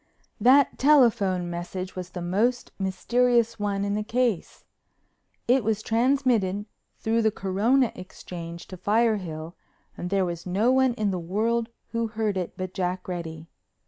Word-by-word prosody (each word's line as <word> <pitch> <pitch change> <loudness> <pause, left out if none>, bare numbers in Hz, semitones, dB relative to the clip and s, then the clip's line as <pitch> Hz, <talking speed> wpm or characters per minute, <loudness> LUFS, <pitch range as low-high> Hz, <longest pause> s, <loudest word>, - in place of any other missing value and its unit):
That 270 +2 +5
telephone 230 -11 +4
message 175 +2 -5
was 180 -1 -6
the 180 -1 -6
most 225 +8 0
mysterious 230 +5 +1
one 200 -1 -1
in 200 - -1
the 210 - 0
case. 230 -3 -1 0.8
It 250 +1 +4
was 215 0 0
transmitted 230 -5 +1 0.3
through 225 +1 +1
the 220 - +3
Corona 220 +7 +1
Exchange 170 -2 -9
to 185 - -8
Firehill 185 -6 0 0.4
and 180 - -5
there 195 -1 +2
was 175 0 -5
no 205 +7 +2
one 260 -2 +3
in 210 -4 0
the 185 - -2
world 225 +7 0 0.2
who 230 -1 -1
heard 215 -2 -1
it 180 -2 -4
but 185 0 -5
Jack 185 0 -2
Reddy. 165 -3 -5
205 Hz, 145 wpm, -26 LUFS, 185-235 Hz, 0.8 s, That